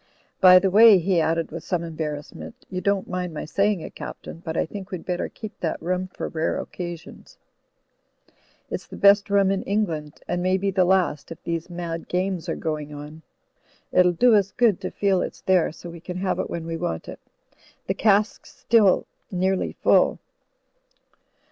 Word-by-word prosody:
By 185 -1 +9
the 190 +1 +2
way," 215 +1 +8
he 180 -1 +1
added 165 +1 0
with - - -7
some 175 -3 -2
embarrassment, 155 -3 -6 0.2
"you 185 0 -3
don't 200 -1 0
mind 180 -2 -4
my - - -4
saying 200 +2 +1
it. - - -8
Captain, 165 - -9
but 160 -1 -4
I - - +1
think 195 +2 -8
we'd 180 -3 -6
better 180 -1 -2
keep 215 -1 -10
that 165 - -2
rum 180 +2 -2
for 185 - -6
rare 160 0 -1
occasions. 175 -2 -8 1.3
It's - - -5
the - - -10
best 200 +1 +5
rum 200 -1 +3
in 195 - 0
England, 165 -8 -2
and 175 - -1
may 185 +1 +2
be 195 +1 -1
the 185 -1 +3
last, 180 -6 +1
if 165 - -9
these 170 +1 -3
mad 170 -1 -5
games 180 -1 -2
are - - -1
going 150 -2 -4
on. 150 +2 -9 0.7
It'll 180 -1 +5
do 235 +8 +4
us 200 -2 +3
good 230 -7 +2
to - - -3
feel 195 -2 +1
it's - - -5
there, 185 -4 +2
so 170 +2 -10
we 170 - -10
can 180 +2 -7
have 185 +1 -1
it - - -2
when 170 -1 -5
we 165 0 -4
want 160 - -4
it. - - -8 0.7
The 190 - 0
cask's 210 +1 +1
still 210 -5 +3 0.2
nearly 190 +1 0
full." - - +4
180 Hz, 185 wpm, -24 LUFS, 165-195 Hz, 1.3 s, By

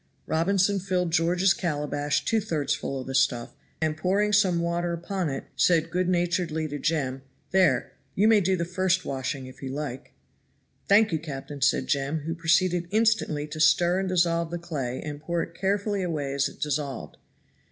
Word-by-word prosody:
Robinson 195 +4 +2
filled 180 -2 -1
George's 175 +3 +3
calabash 145 -3 -1
two 225 -1 +2
thirds 150 -8 -1
full 135 -2 -4
of 130 - -6
the 135 - -5
stuff, 125 -3 +1 0.3
and 155 -1 0
pouring 195 +6 +1
some 190 -4 +4
water 170 0 -1
upon 175 0 -2
it, 135 - -4
said 165 -1 +3
good 180 0 0
naturedly 175 -3 0
to 145 0 -5
Jem, 135 -4 -1 0.3
"There 190 -1 +2 0.2
you 205 +3 +4
may 220 -2 +5
do 190 +1 +2
the 170 - -1
first 185 +1 0
washing, 135 0 -3
if 130 - -13
you 135 - -5
like." 135 -2 -6 0.8
"Thank 210 +1 +5
you, 160 - 0
captain," 145 -2 -7
said 130 -1 +2
Jem, 140 +3 -1
who 165 +3 -3
proceeded 170 +1 +2
instantly 215 -9 +1
to 155 - -6
stir 175 +4 +4
and 190 -1 -2
dissolve 170 -2 +1
the 175 - -3
clay 145 -8 -4
and 150 -1 -6
pour 170 +2 -1
it 170 - -9
carefully 200 +2 -1
away 150 -6 -2
as 140 0 +1
it - - -16
dissolved. 140 - -3
170 Hz, 180 wpm, -26 LUFS, 145-185 Hz, 0.8 s, may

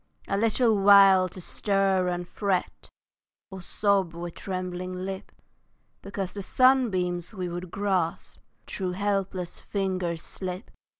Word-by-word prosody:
A 195 - 0
little 225 +2 +3
while 195 -2 +7
to 185 - -10
stir 195 0 0
and 175 0 -3
fret, 195 -1 -2 0.6
Or 190 -1 -8
sob 195 -2 0
with 170 0 -6
trembling 185 -1 -5
lip 190 +1 -6 0.7
Because 195 -1 -5
the 200 - -5
sunbeams 195 -7 +2
we 185 -2 -3
would 175 +1 -6
grasp 190 -4 -2 0.3
Through 185 -2 -3
helpless 195 -2 -2
fingers 185 -4 -2
slip. 185 +2 -7
190 Hz, 120 wpm, -27 LUFS, 180-200 Hz, 0.7 s, while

